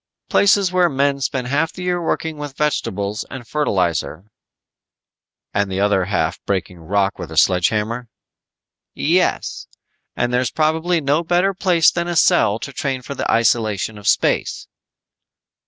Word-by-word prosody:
"Places 200 Hz, -2 st, +4 dB
where 180 Hz, -1 st, +3 dB
men 140 Hz, -1 st, 0 dB
spend 130 Hz, -1 st, -2 dB
half 150 Hz, +5 st, 0 dB
the 180 Hz, -, -8 dB
year 180 Hz, -1 st, -1 dB
working 160 Hz, -1 st, -2 dB
with 145 Hz, -2 st, -7 dB
vegetables 105 Hz, -8 st, -1 dB
and 125 Hz, -3 st, -9 dB
fertilizer 95 Hz, -, -1 dB, 0.6 s
" -, -, -66 dB
"And 100 Hz, -1 st, 0 dB
the 95 Hz, -, -2 dB
other 100 Hz, -2 st, +2 dB
half 85 Hz, -3 st, -1 dB
breaking 95 Hz, -2 st, -2 dB
rock 100 Hz, +4 st, -1 dB
with 80 Hz, -, -7 dB
a 80 Hz, -, -7 dB
sledge 90 Hz, 0 st, +4 dB
hammer?" 115 Hz, +3 st, -3 dB, 0.9 s
"Yes. 175 Hz, +5 st, 0 dB, 0.5 s
And 120 Hz, 0 st, -1 dB
there's 125 Hz, -1 st, +1 dB
probably 160 Hz, +2 st, 0 dB
no 145 Hz, +3 st, +1 dB
better 175 Hz, +4 st, +1 dB
place 180 Hz, -4 st, +3 dB
than 170 Hz, 0 st, -2 dB
a 175 Hz, -, -2 dB
cell 105 Hz, -8 st, +4 dB
to 140 Hz, -, -6 dB
train 130 Hz, -2 st, -3 dB
for 140 Hz, -, -6 dB
the -, -, -3 dB
isolation 110 Hz, -2 st, +1 dB
of 100 Hz, -, -8 dB
space." -, -, +1 dB
130 Hz, 155 wpm, -20 LUFS, 100-160 Hz, 0.9 s, Places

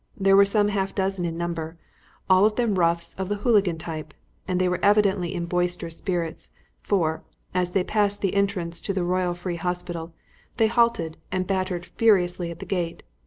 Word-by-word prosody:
They 195 Hz, 0 st, +4 dB
were 200 Hz, +1 st, +7 dB
some 205 Hz, +1 st, +2 dB
half 195 Hz, -1 st, -2 dB
dozen 190 Hz, -2 st, -1 dB
in 165 Hz, -1 st, -3 dB
number, 165 Hz, -1 st, -4 dB, 0.5 s
all 185 Hz, 0 st, +5 dB
of 210 Hz, 0 st, +3 dB
them 225 Hz, -6 st, +1 dB
roughs 170 Hz, 0 st, +1 dB
of 190 Hz, 0 st, -2 dB
the 205 Hz, -, 0 dB
hooligan 205 Hz, -5 st, +2 dB
type, 155 Hz, -2 st, -7 dB, 0.3 s
and 185 Hz, -1 st, 0 dB
they 185 Hz, -, +2 dB
were 180 Hz, -1 st, 0 dB
evidently 200 Hz, -3 st, +3 dB
in 170 Hz, -1 st, -2 dB
boisterous 175 Hz, -1 st, -1 dB
spirits, 175 Hz, -4 st, -3 dB, 0.3 s
for, 160 Hz, -6 st, 0 dB, 0.3 s
as 180 Hz, -1 st, 0 dB
they 195 Hz, -, +2 dB
passed 205 Hz, 0 st, 0 dB
the 195 Hz, -, 0 dB
entrance 195 Hz, -4 st, -1 dB
to 195 Hz, -, -2 dB
the 185 Hz, -, 0 dB
Royal 180 Hz, 0 st, 0 dB
Free 175 Hz, 0 st, -4 dB
Hospital, 175 Hz, -1 st, -4 dB, 0.5 s
they 220 Hz, -1 st, +4 dB
halted 230 Hz, -9 st, +1 dB
and 185 Hz, 0 st, -1 dB
battered 185 Hz, -2 st, -2 dB
furiously 180 Hz, -6 st, +2 dB
at 170 Hz, -, -7 dB
the -, -, -8 dB
gate. 175 Hz, -4 st, -3 dB
180 Hz, 185 wpm, -25 LUFS, 170-200 Hz, 0.5 s, were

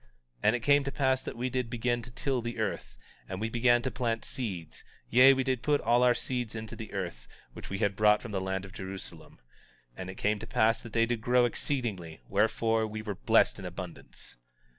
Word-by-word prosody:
18:24 -, -, -31 dB, 0.3 s
And 105 Hz, +3 st, +4 dB
it -, -, -1 dB
came 145 Hz, +3 st, +4 dB
to 140 Hz, -, -3 dB
pass 130 Hz, -2 st, +1 dB
that -, -, -6 dB
we 125 Hz, +2 st, -1 dB
did 125 Hz, -2 st, -1 dB
begin 120 Hz, +1 st, 0 dB
to 120 Hz, -, -10 dB
till 130 Hz, +1 st, -1 dB
the 120 Hz, +1 st, -5 dB
earth, 110 Hz, -3 st, -3 dB, 0.3 s
and 95 Hz, 0 st, -4 dB
we 110 Hz, +1 st, -1 dB
began 120 Hz, 0 st, +3 dB
to 130 Hz, -, -1 dB
plant 115 Hz, -2 st, -2 dB
seeds; 95 Hz, -11 st, -5 dB, 0.3 s
yea, 130 Hz, +3 st, +8 dB
we 135 Hz, -1 st, +2 dB
did 130 Hz, -2 st, 0 dB
put 145 Hz, -1 st, +2 dB
all 120 Hz, +2 st, +3 dB
our 125 Hz, -1 st, +5 dB
seeds 120 Hz, -2 st, -2 dB
into 110 Hz, -1 st, -6 dB
the 110 Hz, -, -8 dB
earth, 90 Hz, -11 st, -5 dB, 0.3 s
which -, -, -9 dB
we 100 Hz, -, -3 dB
had 100 Hz, 0 st, +1 dB
brought 105 Hz, 0 st, +5 dB
from 115 Hz, -, -8 dB
the 95 Hz, -2 st, -1 dB
land 95 Hz, 0 st, -2 dB
of 95 Hz, -, -12 dB
Jerusalem. 95 Hz, 0 st, -8 dB, 0.6 s
And 95 Hz, 0 st, -6 dB
it 95 Hz, -, -7 dB
came 105 Hz, +2 st, 0 dB
to 110 Hz, -, -8 dB
pass 115 Hz, 0 st, +2 dB
that 115 Hz, -2 st, -11 dB
they 115 Hz, 0 st, +4 dB
did 115 Hz, -1 st, -2 dB
grow 125 Hz, +1 st, +4 dB
exceedingly; 110 Hz, -, -3 dB
wherefore, 110 Hz, +2 st, +2 dB
we 110 Hz, 0 st, -6 dB
were 105 Hz, -2 st, -3 dB
blessed -, -, +3 dB
in -, -, -7 dB
abundance. -, -, -8 dB
115 Hz, 225 wpm, -30 LUFS, 105-125 Hz, 0.6 s, yea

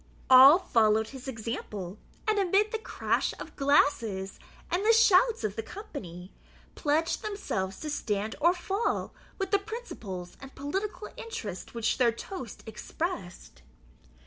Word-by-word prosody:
All 265 Hz, +5 st, +10 dB
followed 220 Hz, -, +2 dB
his 265 Hz, -1 st, -10 dB
example, 215 Hz, -5 st, -5 dB, 0.3 s
and, 430 Hz, -1 st, +2 dB
amid 395 Hz, +3 st, +2 dB
the 445 Hz, -, -2 dB
crash -, -, -1 dB
of -, -, -9 dB
glasses 230 Hz, -9 st, +1 dB, 0.3 s
and 365 Hz, +3 st, +1 dB
the 450 Hz, +2 st, +5 dB
shouts 450 Hz, -, +5 dB
of 210 Hz, -2 st, -2 dB
the -, -, -2 dB
company, 210 Hz, -, -9 dB, 0.4 s
pledged 315 Hz, +2 st, 0 dB
themselves 195 Hz, -, -3 dB
to 310 Hz, -, -4 dB
stand 215 Hz, -6 st, -2 dB
or 345 Hz, +3 st, +5 dB
fall 390 Hz, +5 st, -2 dB, 0.2 s
with 390 Hz, -1 st, -3 dB
the 405 Hz, -, +4 dB
principles 235 Hz, -, -7 dB
and 270 Hz, 0 st, -11 dB
political 390 Hz, +9 st, -4 dB
interest 215 Hz, -, -6 dB
which 230 Hz, +2 st, 0 dB
their 240 Hz, -2 st, +5 dB
toast 250 Hz, -, -8 dB
expressed. 215 Hz, -, -5 dB
275 Hz, 135 wpm, -29 LUFS, -, 0.4 s, All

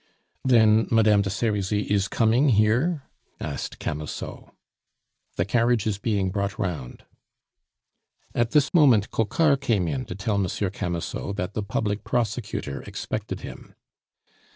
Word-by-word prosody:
"Then 110 Hz, -3 st, +5 dB
Madame 110 Hz, -3 st, +4 dB
de 100 Hz, -, -2 dB
Serizy 105 Hz, 0 st, 0 dB
is 100 Hz, -1 st, +1 dB
coming 120 Hz, +5 st, +3 dB
here?" 125 Hz, -, +2 dB, 0.4 s
asked -, -, -5 dB
Camusot. 75 Hz, 0 st, -6 dB, 0.8 s
"The 85 Hz, -, 0 dB
carriage 120 Hz, +1 st, +2 dB
is 105 Hz, -2 st, -1 dB
being 100 Hz, -4 st, 0 dB
brought 100 Hz, +2 st, -2 dB
round." 80 Hz, -, -4 dB, 1.3 s
At 120 Hz, -1 st, +1 dB
this 145 Hz, +3 st, +2 dB
moment 130 Hz, -, +5 dB
Coquart 140 Hz, +6 st, +2 dB
came 110 Hz, -10 st, +1 dB
in 70 Hz, -5 st, -2 dB
to 90 Hz, -, -6 dB
tell 100 Hz, +1 st, -1 dB
Monsieur 95 Hz, 0 st, -1 dB
Camusot 90 Hz, +1 st, -3 dB
that 95 Hz, 0 st, -3 dB
the 110 Hz, -, -2 dB
public 105 Hz, +1 st, -2 dB
prosecutor 110 Hz, -, -2 dB
expected -, -, -5 dB
him. -, -, -10 dB
105 Hz, 130 wpm, -25 LUFS, 95-115 Hz, 1.3 s, Then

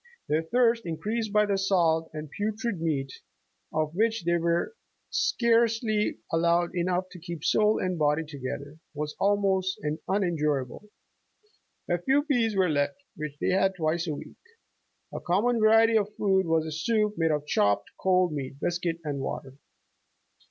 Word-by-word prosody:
Their 155 Hz, +2 st, +1 dB
thirst, 230 Hz, +6 st, +2 dB
increased 215 Hz, +7 st, -2 dB
by 210 Hz, 0 st, +4 dB
the 200 Hz, -1 st, 0 dB
salt 165 Hz, -4 st, +2 dB
and 155 Hz, 0 st, -6 dB
putrid 215 Hz, -2 st, -2 dB
meat, 140 Hz, -5 st, -1 dB, 0.6 s
of 155 Hz, 0 st, -1 dB
which 220 Hz, +1 st, +1 dB
they 170 Hz, +1 st, +2 dB
were 170 Hz, -, 0 dB, 0.4 s
scarce 230 Hz, -1 st, +2 dB
ly 215 Hz, -2 st, 0 dB, 0.2 s
allowed 170 Hz, +1 st, +2 dB
enough 180 Hz, +1 st, -1 dB
to 180 Hz, -, -10 dB
keep 170 Hz, -2 st, -7 dB
soul 215 Hz, 0 st, +3 dB
and 185 Hz, -2 st, -2 dB
body 150 Hz, +1 st, +2 dB
together, 145 Hz, +1 st, -7 dB, 0.2 s
was 150 Hz, +1 st, -4 dB
almost 195 Hz, -2 st, +1 dB, 0.3 s
unendurable. 165 Hz, -2 st, -1 dB, 1.0 s
A 175 Hz, 0 st, 0 dB
few 270 Hz, +8 st, +2 dB
pease 240 Hz, -8 st, +1 dB
were 190 Hz, -1 st, +3 dB
left 145 Hz, -, 0 dB, 0.2 s
which 150 Hz, -2 st, -6 dB
they -, -, +1 dB
had 190 Hz, +1 st, +2 dB
twice 165 Hz, 0 st, -1 dB
a 155 Hz, -, -2 dB
week. -, -, -11 dB, 0.7 s
A -, -, -4 dB
common 225 Hz, +7 st, +1 dB
variety 225 Hz, +1 st, +5 dB
of 210 Hz, 0 st, -4 dB
food 190 Hz, -3 st, +2 dB
was 160 Hz, -1 st, +2 dB
a 160 Hz, -, -5 dB
soup 210 Hz, +7 st, 0 dB
made 165 Hz, -3 st, +1 dB
of 150 Hz, -1 st, -1 dB
chopped 100 Hz, -8 st, +1 dB
cold 185 Hz, -3 st, +2 dB
meat, 140 Hz, -1 st, -5 dB
biscuit 175 Hz, 0 st, -1 dB
and 145 Hz, -3 st, -3 dB
water. 135 Hz, 0 st, -5 dB
175 Hz, 155 wpm, -27 LUFS, 155-210 Hz, 1.0 s, variety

